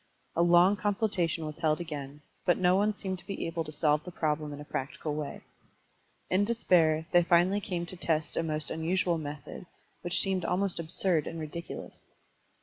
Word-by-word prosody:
A 170 - +3
long 175 +3 +6
consultation 195 -5 0
was 155 +1 -6
held 155 -1 +2
again, 150 -4 -6 0.2
but 175 - +3
no 180 0 +4
one 205 +2 +2
seemed 190 -2 -4
to - - -17
be 195 - -3
able 165 0 -2
to 155 - -7
solve 150 0 +2
the - - -7
problem 155 -3 -1
in 145 - -7
a 150 - -8
practical 145 +2 -4
way. 150 -1 -5 0.9
In 185 +2 +2
despair 170 -8 +3
they 175 - +6
finally 175 +4 +3
came 175 -4 -3
to 180 - -5
test 160 -3 -1
a - - +1
most 155 -2 -2
unusual 170 +1 0
method, 150 +3 -7 0.3
which 175 +1 +1
seemed 190 -2 +1
almost 180 +1 0
absiu"d 165 -1 +1
and 165 - -6
ridiculous. 160 +2 -7
170 Hz, 180 wpm, -30 LUFS, 155-185 Hz, 0.9 s, long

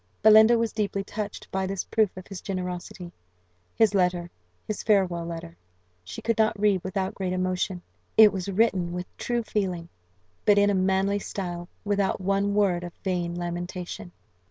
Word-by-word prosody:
Belinda 220 +2 +8
was 230 -1 -1
deeply 200 -2 -1
touched 205 0 -6
by 190 0 -1
this 195 -1 -2
proof 215 -5 +1
of 185 - -8
his 195 -4 -8
generosity. 180 -2 -5 0.6
His 220 -3 +4
letter 180 -2 +1 0.4
his 215 - -3
farewell 185 -5 +2
letter 165 - -7 0.5
she 90 - -8
could 230 -1 0
not 220 -1 +2
read 200 -3 +2
without 190 0 -2
great 185 -2 -3
emotion. 185 0 -1 0.3
It 215 -2 +8
was 190 0 -3
written 190 -4 +1
with 180 0 -4
true 240 -1 -1
feeling, 180 -6 -2 0.5
but 205 -1 +5
in 205 0 +5
a - - +1
manly 190 +1 +2
style, 175 -3 -5 0.2
without 200 -1 +1
one 200 +1 0
word 190 -4 +2
of 175 -1 -7
vain 175 -3 -1
lamentation. 175 +2 -5
190 Hz, 160 wpm, -26 LUFS, 180-205 Hz, 0.6 s, Belinda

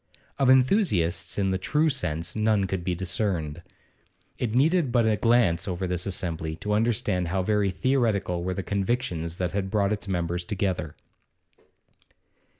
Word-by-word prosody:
Of 135 -2 +3
enthusiasts 130 - +2
in 95 -1 +1
the 95 - -1
true 150 +11 +1
sense 85 - -2
none 110 -2 +2
could 95 -2 -3
be 90 0 -1
discerned. 85 -4 -2 0.8
It 115 -2 -1
needed 155 +1 +3
but 120 -2 +3
a 110 -1 +3
glance 110 -5 +2
over 95 0 -2
this 90 +1 -2
assembly 80 -4 -3
to 105 +5 -3
understand 105 -5 0
how 95 +2 -1
very 105 0 +1
theoretical 105 -6 0
were 90 +1 -2
the 95 - -3
convictions 95 -5 -2
that 90 -1 -2
had 95 0 -2
brought 100 0 +1
its 105 -1 -5
members 90 -2 -2
together. 95 -6 -2
95 Hz, 150 wpm, -26 LUFS, 90-110 Hz, 0.8 s, Of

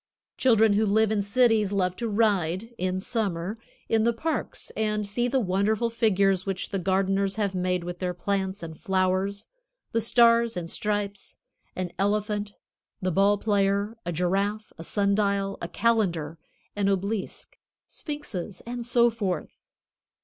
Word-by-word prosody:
Children 225 -4 +4
who 215 +2 +3
live 220 +1 +3
in 210 -2 +1
cities 215 -1 +3
love 185 -3 0
to 235 - -2
ride, 205 -1 +1
in 185 0 -1
summer, 195 -3 -2 0.3
in 225 -1 +2
the 235 +1 +3
parks 305 +2 -3
and 210 -1 0
see 240 +5 0
the 265 +2 +1
wonderful 210 +3 +1
figures 195 -4 +2
which 195 -1 -3
the 195 - -2
gardeners 195 +1 +1
have 205 -3 -1
made 180 -1 0
with 175 0 -6
their 180 -1 -2
plants 195 0 -2
and 160 -1 -8
flowers, 190 0 0 0.5
the 230 - +1
stars 230 -1 +4
and 170 -1 -4
stripes, 205 -1 -3 0.4
an 180 -1 -3
elephant, 205 0 0 0.4
the 185 -2 -1
ball 200 +3 +4
player, 200 +1 +1
a 175 - -3
giraffe, 195 +5 -1
a 165 - -9
sun 200 +3 +1
dial, 200 -1 0
a - - -3
calendar, 175 -9 0 0.4
an 200 -1 +1
obelisk, 200 +1 -3 0.3
sphinxes, 255 - -6
and 240 0 -5
so 240 -1 +4
forth. 195 -7 -2
200 Hz, 150 wpm, -26 LUFS, 185-220 Hz, 0.5 s, Children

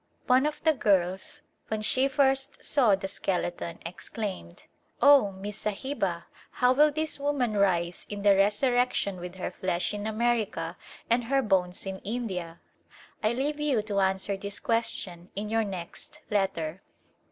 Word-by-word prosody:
One 260 +3 +4
of 300 - -5
the 320 -1 +5
girls 190 -7 0 0.2
when 215 -1 -2
she 260 +5 +3
first 270 0 +1
saw 245 -9 +4
the 195 0 -5
skeleton, 175 -3 -2
exclaimed, 180 - -6 0.2
" - - -41
Oh, 280 -8 +6
Miss 195 +2 -7
Sahiba, 200 -6 -2 0.3
how 250 0 +4
will 300 +3 +5
this 310 0 -2
woman 280 -6 0
rise 175 -3 +1
in 205 -1 -5
the 200 -1 +6
resurrection 210 -1 +2
with 180 +1 -7
her 185 - -4
flesh 185 +1 -1
in 205 +1 -3
America 220 -7 0 0.3
and 235 +1 +2
her 270 +2 +2
bones 185 -4 0
in 190 0 -4
India? 190 -7 -4 0.3
" - - -24
I 215 +2 +3
leave 290 +4 -1
you 280 -8 +1
to 205 -2 -1
answer 190 +1 +1
this 200 +1 -5
question 190 -6 -2
in 210 +2 -3
your 225 0 +2
next 200 - -7
letter. 190 -4 -1
205 Hz, 155 wpm, -28 LUFS, 190-250 Hz, 0.3 s, Oh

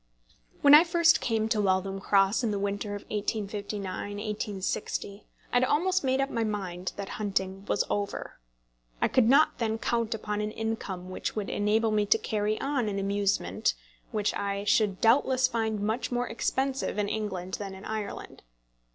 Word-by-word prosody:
When 285 0 +7
I 300 +2 +10
first 335 -1 +4
came 220 -2 0
to 215 -2 +2
Waltham 195 0 0
Cross 195 +3 +3
in 230 - +1
the 205 - -1
winter 200 +1 -2
of 205 - -7
1859 205 -1 -3
1860, 205 -1 -4 0.3
I - - 0
had 245 - +3
almost 360 +7 +2
made 260 0 +1
up 275 0 0
my 230 - 0
mind 185 -4 -3
that 200 -1 -5
my - - -6
hunting 195 -2 -2
was - - +2
over. 205 -1 -3 0.6
I - - +3
could 255 -3 +3
not 280 +1 +4
then 220 -1 0
count 230 -1 -1
upon 210 -1 -3
an 210 - -1
income 200 -5 -4
which - - -4
would 210 -2 -3
enable 215 +2 +2
me 210 -1 +1
to - - +5
carry 215 0 -1
on 270 -5 0
an 200 - -3
amusement 200 0 0 0.4
which 210 -3 0
I 200 0 -2
should 205 -2 +2
doubtless 255 +2 +4
find 225 -3 -1
much 220 +6 -1
more 245 0 0
expensive 265 +2 -1
in 205 -1 +1
England 190 -4 -3
than 195 -2 -5
in 190 - -11
Ireland. 215 -2 -5
210 Hz, 175 wpm, -28 LUFS, 200-230 Hz, 0.6 s, I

